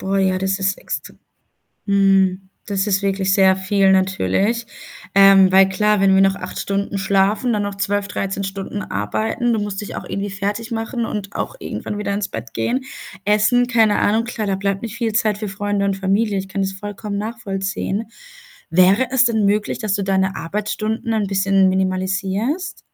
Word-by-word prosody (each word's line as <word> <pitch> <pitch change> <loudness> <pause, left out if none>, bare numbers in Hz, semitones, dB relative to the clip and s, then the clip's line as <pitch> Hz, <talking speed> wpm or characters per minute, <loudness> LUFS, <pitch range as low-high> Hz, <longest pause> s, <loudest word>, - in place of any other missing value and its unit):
Boah, 195 +1 -1
ja, 190 -1 +2
das 190 +1 -1
ist 190 0 0
extr - - -6 0.7
mhm. 195 -1 +2 0.2
Das 200 0 -1
ist 200 0 +1
wirklich 195 -1 0
sehr 190 -1 +5
viel, 195 0 +2
natürlich. 190 - +1 0.5
Ähm, 195 -1 +7
weil 190 0 +6
klar, 210 +2 +2
wenn 195 0 +4
wir 195 - +5
noch 195 0 +4
8 - - -7
Stunden 200 0 -2
schlafen, 200 +5 +1
dann 210 - 0
noch 205 -1 -3
12, 200 0 -1
13 195 0 -3
Stunden 195 +1 -5
arbeiten, 220 - -1
du 220 - 0
musst 205 -1 -4
dich 205 - -7
auch - - -5
irgendwie 200 0 -4
fertigmachen 225 +4 -3
und 205 -2 -5
auch - - -3
irgendwann 210 - -5
wieder 205 - -2
ins 205 -1 -2
Bett - - -8
gehen, 255 +2 -1 0.4
essen, 210 +4 +3
keine 225 -4 +3
Ahnung. 220 +2 +2
Klar, 230 -2 -4
da 195 - +1
bleibt 195 +1 -2
nicht 230 -2 -6
viel 230 -2 -2
Zeit 215 -1 +1
für 210 0 -4
Freunde 200 0 -2
und 195 - 0
Familie, 195 +2 0
ich 190 - -6
kann 195 0 -2
das 190 - -2
vollkommen 205 +1 -5
nachvollziehen. 205 -1 -3 0.7
Wäre 190 +8 +4
es 260 -1 +4
denn 220 -3 +2
möglich, 205 +1 0
dass 215 -4 -2
du 200 0 -1
deine 190 0 +1
Arbeitsstunden 215 +5 -3
ein 215 -2 0
bisschen 195 0 +3
minimalisierst? 190 - -1
200 Hz, 180 wpm, -20 LUFS, 195-215 Hz, 0.7 s, Ähm